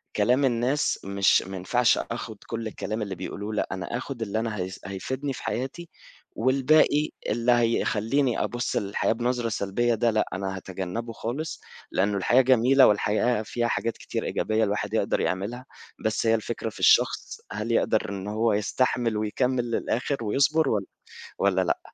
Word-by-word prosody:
كلام 125 +6 +3
الناس 125 +4 +1
مش 100 0 +3
ماينفعش 95 +6 +1
أخد 115 -2 -5
كل 115 -1 -4
الكلام 110 +1 -4
اللي 100 -2 -3
بيقولوا 100 +4 -5
لأ 105 - 0
أنا 95 +5 -3
آخد 130 -1 -6
اللي 110 0 -1
أنا 115 -1 -2
ه 90 - -3 0.2
هيفيدني 130 +9 -4
في - - -9
حياتي 135 +7 -4 0.5
والباقي 145 +4 +3 0.2
اللي 120 +3 +2
هيخلّيني 120 +2 +1
أبُص 120 +1 -2
للحياة 100 +1 0
بنظرة 120 0 -1
سلبيّة 115 +4 0
ده 115 +1 +2
لأ 110 - +1
أنا 95 0 -3
هاتجنبه 95 +5 -5
خالص 140 +9 -4 0.3
لأنّه 100 +1 +1
الحياة 120 +7 +4
جميلة 130 +1 +5
والحياة 105 +3 +2
فيها 120 +2 -1
حاجات 115 -1 -1
كتير - - -4
إيجابية 110 0 0
الواحد 105 0 -2
يقدر 105 -3 +1
يعملها 100 +9 -2 0.4
بس 110 +1 0
هي 115 - +5
الفكرة 110 - -3
في - - -13
الشخص - - +3
هل 105 +3 -3
يقدر 110 -2 +1
إن 100 0 -5
هو 110 +1 +1
يستحمل 115 +2 0
ويكمل 120 +3 0
للآخر 125 +4 -1
ويصبر 140 +7 +2
والّا 100 -3 -1 0.5
والّا 95 -1 +3
لأ. 90 - 0
115 Hz, 155 wpm, -26 LUFS, 105-125 Hz, 0.5 s, جميلة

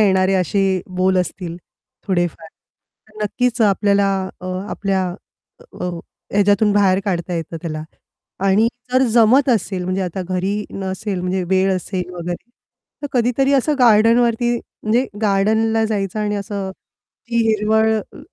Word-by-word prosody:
येणारे 190 -2 +3
असे 190 +1 +1 0.2
बोल 185 0 +2
असतील 180 -1 -3 0.5
थोडेफार 175 -4 -1 0.6
तर 215 -1 -8
नक्कीच 245 +3 -1
आपल्याला 200 -1 +3 0.3
अ, 185 - -7 0.2
आपल्या 195 -2 -1 0.7
अ, - - -2 0.5
ह्याच्यातून 205 +1 +3
बाहेर 195 -2 +3
काढता 180 -3 -2
येतं 165 0 -4
त्याला. 155 -3 -4 0.6
आणि 195 +3 +4 0.3
जर 255 +1 +4
जमत 245 +4 +5
असेल 190 -3 -2
म्हणजे 185 +1 -1
आता 185 +1 -4
घरी 185 +1 -1 0.2
नसेल 190 0 -4
म्हणजे 180 +1 -1
वेळ 190 0 +3
असेल 180 0 -4
वगैरे 175 +6 -6 0.5
तर - - -1
कधीतरी 250 +3 +2
असं 280 +3 +2
गार्डनवरती 235 0 +4
म्हणजे 230 +3 -1 0.2
गार्डनला 220 +2 +2
जायचं 205 -2 -2
आणि 210 0 -1
असं 200 -1 -4
ती 235 +4 -11
हिरवळ 220 +1 +2 0.2
अ, - - -13
200 Hz, 130 wpm, -19 LUFS, 185-220 Hz, 0.7 s, जमत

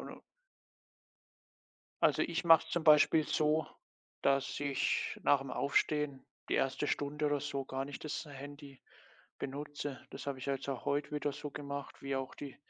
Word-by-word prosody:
und - - -13 1.8
Also, - - +4
ich 170 0 -1
mache 165 -1 +8
es - - -12
zum 165 -1 -1
Beispiel 155 0 +6
so, 155 +1 +2 0.6
dass 140 +1 +1
ich 140 -2 0
nach 145 - +5
dem 135 -1 -6
Aufstehen 140 0 0 0.2
die - - +1
1. 135 +2 +1
Stunde 150 +1 -1
oder 145 -1 +1
so 140 -1 -3
gar 135 0 -3
nicht 145 +2 -8
das 155 +1 -3
Handy 145 -1 -10 0.6
benutze. 145 0 -5
Das 135 - -8
habe 140 -2 -2
ich 125 - -7
jetzt 135 0 -2
auch 135 -3 -3
heute 145 +1 0
wieder 145 -1 -1
so 145 +1 -6
gemacht, 140 -1 -6
wie 135 -1 -1
auch 135 0 -4
die 140 -2 -8
145 Hz, 165 wpm, -34 LUFS, 135-150 Hz, 1.8 s, mache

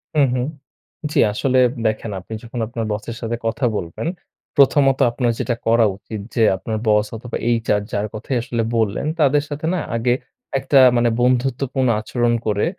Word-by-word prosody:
হুম, 145 -2 +5
হুম। 125 - 0 0.7
জী - - +1
আসলে 130 +4 +1 0.3
দেখেন 110 0 -2
আপনি 95 - -10
যখন 120 +1 -6
আপনার 115 -1 -4
বসের 110 +2 -5
সাথে 120 0 -2
কথা 115 +2 0
বলবেন, 85 - -5 0.5
প্রথমত 140 -1 +4
আপনার 120 -1 0
যেটা 120 - 0
করা 115 0 +5
উচিত 105 +2 -8 0.2
যে 115 - +3
আপনার 110 +4 -4
বস 105 0 +4
অথবা 120 +1 -5 0.3
HR 105 -2 +1
যার 100 +1 -1
কথাই 115 +4 -4
আসলে 120 -2 -1
বললেন, 110 0 0
তাদের 145 -1 +3
সাথে 145 +2 -4
না 185 - 0 0.2
আগে 120 +1 +2 0.5
একটা 135 +1 +3 0.2
মানে 120 0 +3
বন্ধুত্বপূর্ণ 130 +1 +1
আচরণ 120 +1 0
করে, 105 -1 +1
120 Hz, 165 wpm, -20 LUFS, 110-130 Hz, 0.7 s, হুম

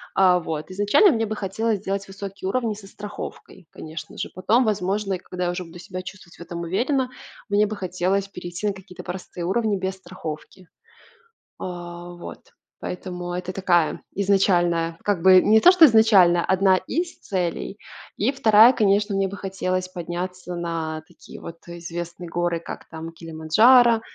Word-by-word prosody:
А, 185 -2 +5
вот. 160 -1 -5
Изначально 205 - +4
мне 225 -4 0
бы 215 0 -4
хотелось 210 +2 -1
сделать 195 0 -3
высокие 195 0 -7
уровни 230 +1 0
со 200 -1 -12
страховкой, 205 -3 -9
конечно 155 0 -9
же. - - -4
Потом, 210 +7 +2
возможно, 200 -2 -1
и - - -1
когда 180 0 -5
я 175 - 0
уже 180 0 -5
буду 165 +1 -12
себя 185 0 -7
чувствовать 185 -2 -12
в - - -15
этом 170 0 -6
уверенно, 250 - 0 0.4
мне 205 +1 +3
бы 215 - -4
хотелось 190 +1 -1
перейти 180 +2 -5
на 205 - 0
какие-то 190 -1 -12
простые 180 -1 -6
уровни 210 +2 +1
без 190 0 -3
страховки. 180 -1 -9 0.9
А, 175 -1 -7
вот. 175 - -9 0.4
Поэтому 180 -1 -5
это 180 +1 -4
такая 175 -4 +1
изначальная, 175 -4 +2
как 205 -4 0
бы, 185 -1 +8
не 220 +3 +5
то, 360 - +9
что 365 -3 +8
изначально, 205 - +5
одна 190 0 +4
из 335 - -3
целей. 185 +2 -3 0.4
И 220 +6 +1
2- 225 -2 +6
конечно, 205 -2 +2
мне 195 0 +1
бы 200 - -7
хотелось 185 -1 -2
подняться 180 +1 -5
на 165 -2 -3
такие - - -14
вот 170 - -9
известные 170 0 -7
горы, 175 0 -1
как 170 - -9
там 160 +1 -7
Килиманджаро, 215 +10 +4
185 Hz, 160 wpm, -23 LUFS, 175-205 Hz, 0.9 s, то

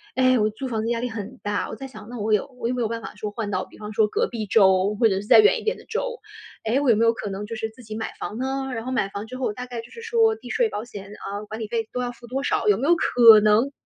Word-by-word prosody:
诶， 255 -1 +4
我 215 0 +2
租 260 +5 -6
房 220 -3 -2
子 225 - -2
压 235 -1 0
力 245 - -2
很 220 -3 -7
大。 205 0 -2
我 - - -6
再 270 - -8
想， 215 -4 -12
那 245 -1 -7
我 215 +1 0
有 210 - +2
我 230 - -1
有 250 - -1
没 245 - -2
有 225 - +1
办 230 0 -4
法 - - -9
说 210 0 -5
换 210 -1 -4
到 185 -1 -1
比 - - -17
方 210 0 -7
说 215 +1 +3
隔 - - 0
壁 225 -3 -4
州， 190 0 +4
或 230 - +6
者 195 - +1
是 - - -11
再 - - +8
远 430 +1 +5
一 - - -10
点 450 +3 0
的 - - -15
州。 485 +1 -3 0.5
诶， 230 +5 +2
我 280 - +2
有 230 - +6
没 230 - +3
有 230 - +4
可 215 - -5
能 195 +1 -5
就 230 +2 -6
是 220 0 -3
自 225 +3 -16
己 215 -1 -7
买 220 0 -4
房 215 - -5
呢？ 265 +1 -2
然 225 -1 -5
后 255 - -3
买 260 -6 +1
房 200 +1 -6
之 255 +2 -7
后 250 -5 -1
大 250 +3 -6
概 245 -2 -6
就 230 - -15
是 460 - -10
说， 450 -1 +2
地 440 - -12
税 475 - +2
保 215 - -4
险 205 -5 -9
啊， 205 0 -6
管 215 +2 -6
理 215 - -3
费 225 -1 -2
都 250 - -2
要 245 -1 -2
付 240 0 -14
多 270 +3 -3
少， 425 - 0
有 415 - +6
没 280 - -1
有 345 - +6
可 230 -8 +7
能 215 +6 +3
230 Hz, 355 characters per minute, -24 LUFS, 210-255 Hz, 0.5 s, 再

